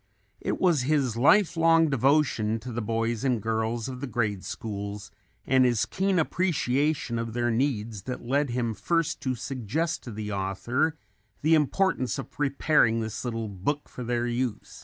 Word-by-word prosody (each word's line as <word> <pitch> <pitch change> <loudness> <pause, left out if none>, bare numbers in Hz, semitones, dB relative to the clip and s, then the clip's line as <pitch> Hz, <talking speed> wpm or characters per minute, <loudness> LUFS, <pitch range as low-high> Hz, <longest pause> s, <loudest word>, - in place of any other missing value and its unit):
It - - -2
was 170 -7 +3
his 135 -3 +1
life 175 - +4
long 165 0 +5
devotion 135 -5 +2
to 125 +2 -7
the 120 +1 -3
boys 115 +2 -1
and 125 -4 +2
girls 110 +1 -1
of 130 -1 -6
the 140 - -3
grade 105 -5 -1
schools 100 -1 -6 0.3
and 130 0 +4
his 120 -3 +2
keen 190 0 0
appreciation 150 -7 0
of 115 -1 -4
their 120 0 0
needs 115 -4 -1
that 125 -2 -5
lead 140 +3 +1
him 120 -2 -1
first 165 - -1
to 130 -1 -1
suggest 135 - -2
to 120 - -6
the 105 0 -5
author 120 +11 -1 0.5
the 160 +2 +4
importance 155 -2 +2
of 135 - -6
preparing 140 -4 +2
this 110 -1 -4
little 115 -3 -3
book 105 +10 -3
for 125 - -8
their 120 0 -1
use. 120 -2 -3
125 Hz, 165 wpm, -27 LUFS, 115-145 Hz, 0.5 s, long